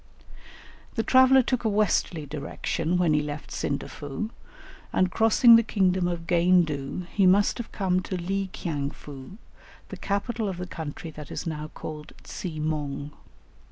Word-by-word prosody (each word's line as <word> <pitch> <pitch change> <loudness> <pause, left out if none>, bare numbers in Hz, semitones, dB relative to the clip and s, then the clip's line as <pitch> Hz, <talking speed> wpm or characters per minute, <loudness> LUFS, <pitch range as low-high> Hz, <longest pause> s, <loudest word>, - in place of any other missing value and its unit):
The 225 - 0
traveller 260 +1 +6
took 250 0 -1
a 220 - +2
westerly 200 -6 +1
direction 155 +3 -2
when 175 -3 +3
he 150 - +3
left 150 0 -6
Sindafou, 145 +7 -4 0.6
and 185 -1 +2
crossing 230 +1 +6
the - - +5
kingdom 190 -5 +1
of 170 -1 -3
Gaindu 170 -3 +2
he 195 -2 +4
must 200 +5 +4
have 235 - -6
come 185 -2 +1
to 185 0 -4
Li 195 +2 -2
kiang 145 -7 -3
foo, 145 +4 -11 0.5
the - - -7
capital 210 +2 -2
of 185 - -5
the 180 - -4
country 160 -2 -7
that 150 -1 -10
is - - -5
now 155 -2 -4
called 150 -1 -8
Tsi 160 -4 -6
mong. 150 -2 -3
180 Hz, 155 wpm, -26 LUFS, 150-200 Hz, 0.6 s, traveller